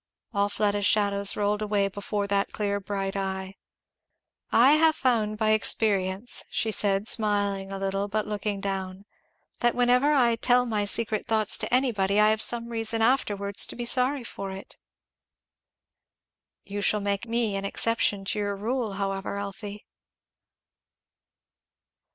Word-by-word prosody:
All 200 0 +1
Fleda's 205 0 +1
shadows 200 -1 +2
rolled 210 0 0
away 205 -2 +1
before 205 +1 -3
that 200 0 -1
clear 200 -1 -2
bright 195 -1 -4
eye. 190 -1 -4 1.0
"I 250 +4 +6
have 315 +1 +4
found 225 -7 0
by 215 0 +2
experience," 205 0 +1
she 220 - -1
said, 200 0 0
smiling 205 -3 -1
a 195 - -4
little 195 +1 -2
but 215 +1 -2
looking 210 -1 -3
down, 195 0 -4 0.5
"that 240 -1 +1
whenever 250 +4 +3
I 240 -5 +3
tell 245 +1 +3
my 215 -3 -1
secret 215 +1 -1
thoughts 220 -2 +3
to - - -3
anybody 210 -6 +1
I 215 0 +5
have 220 0 -1
some 235 -1 +2
reason 225 -1 -1
afterwards 205 -5 +1
to - - -9
be 240 - -4
sorry 255 +2 +2
for 195 -4 -7
it." 190 0 -9 1.9
"You 205 +1 -5
shall 210 +1 +1
make 200 +2 -2
me 230 -3 -1
an 195 - -3
exception 205 -1 0
to 210 - -1
your 205 -1 -2
rule, 225 +1 -3
however, 195 0 -3
Elfie." 200 +1 -7
205 Hz, 145 wpm, -26 LUFS, 200-230 Hz, 1.9 s, I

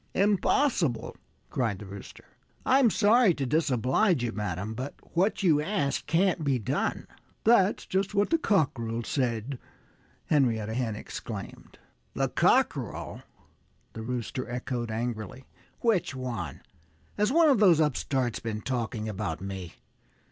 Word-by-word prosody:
"Impossible!" 200 - +1 0.4
cried 115 -6 0
the 105 - -9
Rooster. 100 0 -10 0.4
"I'm 260 -2 +5
sorry 215 -2 +4
to 140 - -2
disoblige 140 - +2
you, 120 - -1
madam. 105 -1 -3
But 130 +5 -5 0.2
what 195 +4 +1
you 155 -5 +4
ask 150 -5 -1
can't 175 -1 +2
be 140 -3 +2
done." 110 - -2 0.4
"That's 215 -3 +4
just 195 +2 -1
what 205 +6 +2
the 330 - +3
cockerel 120 - 0
said!" 125 0 -2 0.7
Henrietta 115 -7 +1
Hen 115 -3 -1
exclaimed. 105 -1 -8 0.4
"The - - 0
cockerel!" - - +1 0.7
the 110 - -6
Rooster 125 +1 -4
echoed 120 -1 -3
angrily. 115 +2 -4 0.4
"Which 205 - +1
one? 125 -8 -5 0.5
Has 210 +3 +1
one 325 +1 +5
of 255 - +3
those 180 -7 +6
upstarts 130 -5 0
been 110 -2 -4
talking 115 -3 -3
about 100 -6 -3
me? 95 -3 -6
130 Hz, 125 wpm, -28 LUFS, 110-185 Hz, 0.7 s, those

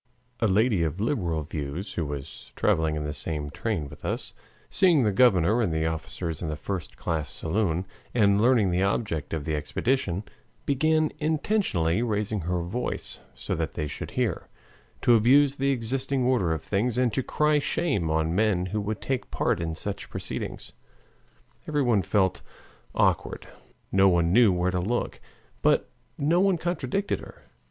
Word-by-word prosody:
A 115 - +3
lady 105 0 +3
of 80 +2 -1
liberal 90 - 0
views, 75 +4 -5
who 80 -4 -2
was 70 -2 -7
traveling 80 -1 +2
in 75 - -2
the 75 0 -3
same 75 -1 -3
train 95 -5 -2
with 70 0 -13
us, - - -3 0.3
seeing 175 -8 +4
the 105 - +2
governor 105 0 +4
and 100 -7 +1
the 80 0 0
officers 80 +1 -3
in 85 - -2
the 75 - -2
first 90 +2 -5
class 80 -3 -2
saloon 90 0 -1 0.3
and 100 -3 +3
learning 115 -5 +4
the 90 +1 +1
object 95 - -1
of 80 -3 -3
the 80 - -1
expedition, 95 - -1 0.4
began, 155 +3 +2
intentionally 150 - +1
raising 105 -2 -1
her 90 0 -1
voice 120 +9 -4 0.2
so - - -4
that 80 -4 -2
they 75 - -2
should 75 - -6
hear, - - 0 0.6
to 120 - +6
abuse 135 +5 +5
the 135 +1 +1
existing 130 +1 0
order 120 -9 +2
of 80 -1 -2
things 110 +4 0
and 125 -3 +2
to 130 - +1
cry 150 +3 +2
shame 140 - 0
on 80 +1 +1
men 100 -2 +2
who 105 +3 -2
would 105 +1 -3
take 130 -2 -2
part - - 0
in 80 -1 -3
such 100 +4 -5
proceedings. - - -5 1.0
Everyone 130 -9 +2
felt 95 +1 +1 0.5
awkward, - - +1 0.4
none 90 -3 +4
knew 115 -2 +6
where 90 0 +1
to 90 - 0
look, 115 +7 -2 0.4
but - - +2 0.3
no 160 +5 +2
one 195 -1 +3
contradicted 175 +3 -1
her. - - -13
100 Hz, 160 wpm, -26 LUFS, 80-125 Hz, 1.0 s, to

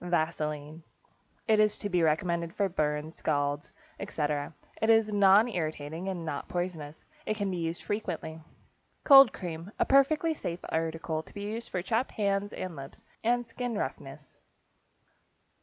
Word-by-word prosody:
=Vaseline.= 155 -2 -2 0.7
It 220 -1 +4
is 210 0 +3
to 205 - -4
be 180 -3 +1
recommended 170 +1 0
for 200 - +2
burns, 150 -3 -1
scalds, 145 -2 -1 0.3
etc. 145 -1 -2 0.3
It 220 - +2
is 225 -1 +5
nonirritating 190 -5 +2
and 185 -3 -4
is - - -6
not 145 -3 -4
poisonous. 170 -4 -4 0.2
It 215 - -1
can 200 -2 -1
be 180 - -3
used 165 0 -3
frequently. 175 -6 -4 0.6
=Cold 270 -4 +9
Cream.= 170 -1 -6
A - - +2
perfectly 300 +4 +4
safe 175 - -5
article 160 0 -2
to - - -18
be 205 - -5
used 225 +3 -5
for 180 - -3
chapped 225 +6 0
hands 200 -1 0
and 185 -3 -5
lips, 135 -1 -10 0.2
and 240 +1 +2
skin 235 -1 -4
roughness. - - -6
175 Hz, 150 wpm, -29 LUFS, 160-215 Hz, 0.7 s, =Cold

